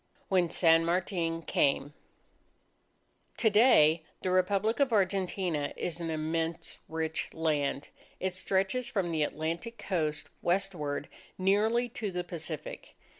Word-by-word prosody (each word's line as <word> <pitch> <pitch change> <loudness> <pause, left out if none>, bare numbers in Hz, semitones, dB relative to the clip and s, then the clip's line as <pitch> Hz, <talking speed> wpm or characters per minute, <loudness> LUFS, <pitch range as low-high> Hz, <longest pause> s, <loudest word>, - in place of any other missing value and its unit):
WHEN 180 -3 +3
SAN 165 -1 +4
MARTIN 170 -1 -1
CAME 145 -1 +1 1.4
To 220 - +4
day, 170 -8 +6 0.2
the 185 - 0
Republic 200 +5 +2
of 275 -3 +3
Argentina 185 -6 0
is 170 -1 -3
an 165 -1 -3
immense 160 +1 -2
rich 160 0 -2
land. 150 -3 -1 0.3
It 185 -1 -1
stretches 195 +6 0
from 190 -5 -1
the 160 -2 0
Atlantic 165 +9 -2
Coast 155 -5 -2
westward 175 -6 -1 0.3
nearly 215 +6 +2
to 220 -2 -4
the 180 -1 -3
Pacific. 165 -3 -7
175 Hz, 120 wpm, -30 LUFS, 160-195 Hz, 1.4 s, day